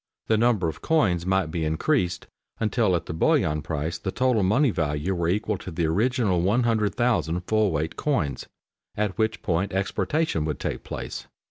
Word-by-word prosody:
The 110 - +2
number 110 -5 +2
of 80 - -5
coins 95 - +1
might 95 -4 +1
be 80 0 -2
increased 90 - 0 0.3
until 110 -3 +2
at 85 - -2
the - - -5
bullion 75 -1 +2
price 80 +3 -3
the 95 - -4
total 125 -2 +2
money 120 +8 +3
value 75 +1 -1
were 85 -2 0
equal 105 +1 0
to - - -7
the 85 -1 -1
original 105 +1 +1
100,000 110 -3 +1
full 110 +3 +1
weight 80 -1 -2
coins, 75 - -1 0.5
at 105 -2 -1
which 110 0 0
point 95 0 0
exportation 100 - 0
would 75 -1 -3
take - - -3
place. - - -6
95 Hz, 165 wpm, -25 LUFS, 80-110 Hz, 0.5 s, money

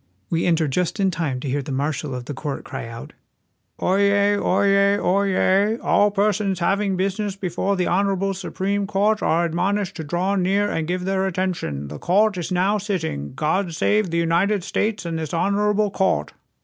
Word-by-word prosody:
We 165 +1 +1
enter 165 -2 +2
just 180 +8 -1
in 195 -1 +2
time 155 -7 -2
to 145 - -5
hear 140 +2 -1
the 140 - -7
marshal 140 0 -2
of 125 -1 -6
the 145 - -5
court 140 +1 -5
cry - - -6
out: 115 0 -9 0.4
" - - -44
Oyez! 200 +1 +3
oyez! 200 +1 +3
oyez! 195 +2 +2
All 205 - +4
persons 200 -1 0
having 195 +3 +1
business 195 +1 -1
be 195 -2 -4
fore 195 +3 -1
the 180 -1 0
honorable 195 +1 +1
Supreme 195 +1 -2
Court 205 +2 +1
are 170 +1 +2
admonished 190 +4 -1
to 160 - -4
draw 175 +6 -1
near 195 +2 +1
and 160 -1 -2
give 180 +1 -2
their 190 0 0
attention. 175 - -3
The 75 +1 -8
court 205 +3 +2
is 170 - -4
now 190 +4 +2
sitting. 165 - -3
God 165 +4 -1
save 210 +3 +1
the 170 - -1
United 170 +4 +1
States 210 +2 -1
and 165 -1 -3
this 160 +1 -4
honorable 205 +3 +1
court!" 80 - 0
190 Hz, 185 wpm, -22 LUFS, 165-200 Hz, 0.4 s, All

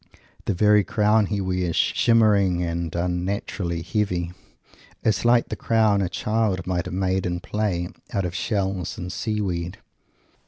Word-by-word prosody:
The 100 - 0
very 105 +2 +5
crown 105 +1 +2
he 105 0 -1
wears, 90 -3 -1
shimmering 100 -6 +3
and 85 -1 -3
unnaturally 90 0 -2
heavy, 90 -4 -1 0.7
is 110 +1 +1
like 120 0 +4
the - - -3
crown 110 -3 +2
a 95 - 0
child 105 -2 0
might 90 -1 -1
have 90 - -5
made 95 0 0
in 90 0 -2
play, 95 -3 -1 0.2
out 100 -2 -1
of 90 - -3
shells 95 -2 -2
and 90 -3 -5
sea 110 -1 -2
weed. 90 -3 -3
95 Hz, 150 wpm, -24 LUFS, 90-105 Hz, 0.7 s, very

